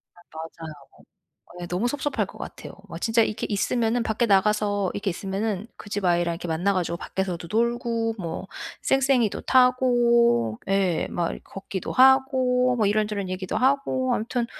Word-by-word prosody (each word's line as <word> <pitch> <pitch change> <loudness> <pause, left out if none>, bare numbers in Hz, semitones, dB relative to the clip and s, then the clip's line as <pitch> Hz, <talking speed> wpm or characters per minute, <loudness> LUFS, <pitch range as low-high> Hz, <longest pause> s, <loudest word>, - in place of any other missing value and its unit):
아 175 - -18
맞아요. 160 0 -8 0.9
예 175 - -5
너무 180 +7 -1
섭섭할 290 +1 -1
것 - - -14
같아요. - - -8 0.2
와 - - -7
진짜 225 0 +2
이렇게 215 0 -2
있으면은 225 +3 0
밖에 225 +1 0
나가서 205 -1 +2
이렇게 205 0 -2
있으면은 195 +3 -3
그 - - -11
집 205 -1 -3
아이랑 175 -1 +2
이렇게 170 0 -7
만나 175 +5 +1
가지고 175 -2 -1
밖에서도 180 -1 -4
놀고 230 0 0
뭐 170 +1 -5 0.4
쌩쌩이도 265 -5 +2
타고 240 - +3
예 190 -4 +1
막 170 -1 -1
이렇게 - - -7
걷기도 195 -1 -6
하고 260 -1 +4
뭐 215 -3 +2
이런저런 210 -2 0
얘기도 185 +2 -4
하고 260 0 +1
아무튼 235 +2 -2
210 Hz, 350 characters per minute, -24 LUFS, 185-245 Hz, 0.9 s, 하고